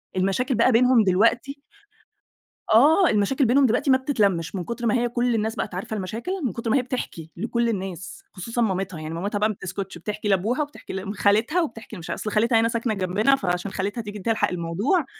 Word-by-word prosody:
المشاكل 195 +8 0
بقى 235 +3 +4
بينهم 245 -1 +5
دلوقتي 230 +9 +1 1.1
آه، 315 - +6
المشاكل 230 +6 +2
بينهم 265 +4 +4
دلوقتي 250 +4 +2
ما 260 - +6
بتتلمِّش 200 - 0
من 180 - -3
كُتر 235 +5 -5
ما 215 - +2
هي 240 0 +1
كل 240 0 0
الناس 220 +1 -1
بقت - - -4
عارفة 200 +4 -4
المشاكل، 215 - -4
من 235 - -1
كتر 230 -1 -4
ما 275 - +3
هي - - +2
بتحكي 235 -10 -5
لكل 235 +3 0
الناس 190 -3 -5
خصوصًا 230 +5 -3
مامتها، 190 -5 -1
يعني 155 +1 -6
مامتها 200 +4 -2
بقى 215 +1 +2
ما - - -2
بتسكُتش، 190 -1 -6
بتحكي 210 +4 -5
لأبوها 205 +9 +1
وبتحكي 290 -8 -7
ل 195 +2 -4
خالتها 225 - +2
وبتحكي 225 -7 -6
لمش 170 -3 -9
ع - - -1
أصل 215 - -4
خالتها 225 +1 +3
هنا 230 - +3
ساكنة 230 -1 -1
جنبنا، 200 +7 +2
فعشان 180 -3 -2
خالتها 205 +5 -3
تيجي 210 -1 -7
تلحق 210 0 0
الموضوع، 185 - 0
220 Hz, 200 wpm, -24 LUFS, 190-245 Hz, 1.1 s, آه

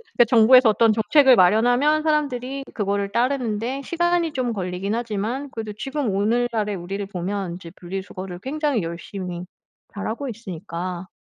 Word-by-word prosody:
그러니까 240 - +6
정부에서 240 +1 +7
어떤 220 0 +4
정책을 260 +4 +5
마련하면 245 +11 +4
사람들이 275 -3 -1
그거를 200 -1 -1
따르는 245 -3 0
데 260 +4 -3
시간이 345 0 +1
좀 245 -3 -1
걸리긴 185 +1 -3
하지만 235 +4 -3
그래도 220 -2 -5
지금 270 -1 -2
오늘날의 220 0 0
우리를 195 +3 -5
보면 190 -1 -3
이제 170 -2 -10
분리수거를 185 0 -6
굉장히 280 - -1
열심히 175 +1 -6 0.5
잘하고 225 +6 -4
있으니까. 185 -4 -6
220 Hz, 385 characters per minute, -23 LUFS, 195-260 Hz, 0.5 s, 정부에서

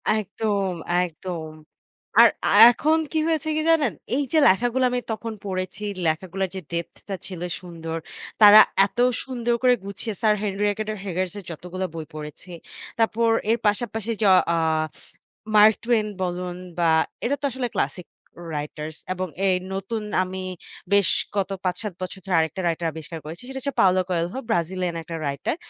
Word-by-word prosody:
একদম, 205 -2 -1 0.3
একদম। 165 -1 -5 0.7
আর - - +9 0.2
আ - - +3 0.2
এখন 310 +6 +2
কি 315 - +1
হয়েছে 315 -1 0
কি - - +1
জানেন? 320 -3 +3 0.2
এই 285 - +1
যে 320 - +4
লেখাগুলো 245 +7 +2
আমি 250 - 0
তখন 225 +1 -4
পড়েছি, 185 +1 -4 0.2
লেখাগুলার 185 +4 -1
যে 190 - -4
depth 170 0 -4
টা 195 - -1
ছিল 180 -3 -7 0.2
সুন্দর। 165 -2 -6 0.4
তারা 210 +1 +11 0.3
এত 200 - -10 0.3
সুন্দর 240 -2 -1
করে 250 -1 +6
গুছিয়ে 205 +2 -5
Sir 215 -1 +4
Henry 200 -1 -2
Rider 215 +1 -2
Haggard 185 -1 -2
এর 200 - -11
যতগুলো 180 +3 -5
বই 160 -1 -5
পড়েছি। 150 +4 -9 0.5
তারপর 225 +1 +2 0.2
এর 230 - +3
পাশাপাশি 225 +1 -1
য - - +4 0.3
অ - - +1 1.0
Mark 215 +1 +8
Twain 230 -2 +2 0.2
বলুন 180 0 -3 0.2
বা 170 - +3 0.4
এরা 280 +4 +1
তো - - -1
আসলে 255 0 -2
ক্লাসিক 180 -3 -2 0.4
writers 150 +1 -5 0.2
এবং 185 0 -3 0.2
এই 185 - +4 0.2
নতুন 210 +3 -3 0.2
আমি 185 0 -5 0.5
বেশ 200 -3 +4 0.3
কত 195 -1 0 0.2
৫-৭ 190 +2 -2
বছর 185 +1 -5
ধরে 190 -3 0
আরেকটা 160 +3 -1
writer 170 0 -1
আবিষ্কার 160 +1 -7
করেছি। 165 +9 -8
সেটা 265 0 -5
হচ্ছে 280 +2 -3
Paulo 185 -1 +4
Coelho, 175 +6 -1
ব্রাজিলিয়ান 180 -2 -1
একটা 165 +1 -7
writer 140 - -2
190 Hz, 160 wpm, -24 LUFS, 175-225 Hz, 1.0 s, তারা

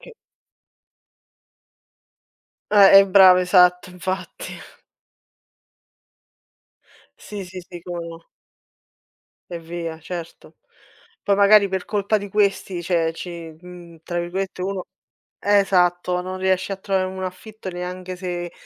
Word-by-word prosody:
Che - - -14 2.6
Eh 195 -1 +8
eh 195 - +6
bravo 185 -1 +7
esatto, 180 0 +4
infatti. 185 +1 -6 2.7
Sì 205 -2 -7
sì 185 +1 -9
sì, 175 -2 -10
come 175 -1 -6
no. 165 0 -11 1.2
E 170 - -5
via, 165 -1 -6
certo. 170 +1 -9 0.7
Poi 200 - +2
magari 200 0 +5
per 190 -1 -4
colpa 210 0 0
di 205 - -7
questi, 195 -3 0
cioè 165 -2 0
ci, 175 +2 -7 0.3
mhmm, 175 -2 -13
tra 175 +1 -4
virgolette 185 +2 -4
uno 190 -1 -3 0.5
esatto, 180 -3 +2
non 185 +1 -6
riesci 190 +1 0
a - - -3
trovare 190 -1 -1
un 190 0 -6
affitto 190 +2 -8
neanche 180 +1 -6
se 175 -1 -5
185 Hz, 115 wpm, -22 LUFS, 175-195 Hz, 2.7 s, Eh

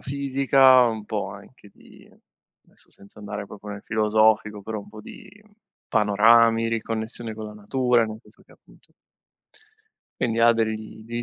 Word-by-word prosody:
fisica, 135 -1 +3
un 110 -3 -3
po' 105 -2 -4
anche 105 +2 -15
di - - -19 0.5
adesso - - -17
senza 100 +2 -17
andare 105 0 -7
proprio 105 +1 -10
nel 100 0 -9
filosofico 110 -1 +1
però 110 +1 -5
un 100 - -12
po' 110 0 -12
di 205 - -13 0.6
panorami, 115 +2 +3
riconnessione 115 0 -4
con 110 0 -8
la 105 - -10
natura, 120 +3 +1
nel 110 0 -8
senso - - -23
che - - -22
appunto - - -24 1.3
Quindi 115 -1 -1
ha 115 0 +6
dei 110 -1 -4
degli 120 +1 -5
110 Hz, 150 wpm, -23 LUFS, 105-115 Hz, 1.3 s, ha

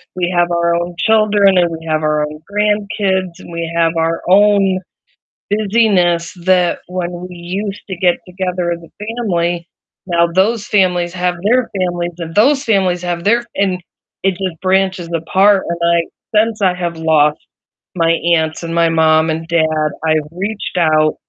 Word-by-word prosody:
we 180 -1 -1
have 175 0 +2
our 170 0 +1
own 175 0 -3
children, 210 -3 +3
and 175 -1 +3
we 165 0 -7
have 155 0 0
our 150 0 +1
own 150 +1 -6
grandkids, 200 -3 -1
and - - -12
we 170 0 -4
have 165 -1 +2
our 165 0 0
own 195 -1 +4 0.7
busyness 195 -5 +2
that 180 -2 +2
when 180 -1 -3 0.2
we 180 - -11
used 195 +4 -5
to 190 - -4
get 175 -1 +2
together 180 -1 -2
as 170 - -5
a 205 +5 -11
family, 175 -6 -1 0.4
now 170 -1 +3
those 210 +4 +1
families 180 -4 +1
have 180 -1 -1
their 250 0 +2
families, 175 -1 -2
and 165 -1 -6
those 270 +6 +3
families 190 -5 +1
have 175 -1 -3
their 235 +4 +2
and 185 -2 0 0.4
it 195 - +3
just 180 -3 -5
branches 190 -2 0
apart, 190 +4 +3
and 170 0 -3
I 170 0 +3 0.3
since 215 +1 +2
I 185 -2 +3
have 175 -2 -4
lost 155 -2 +2 0.6
my 165 -2 +2 0.2
aunts 160 0 -1
and 165 0 -5
my 170 -1 +3
mom 160 0 +3
and 160 +1 -3
dad, 155 -2 +1 0.2
I've 155 -1 +1
reached 195 +2 -4
out 155 -2 +3
175 Hz, 165 wpm, -16 LUFS, 170-195 Hz, 0.7 s, own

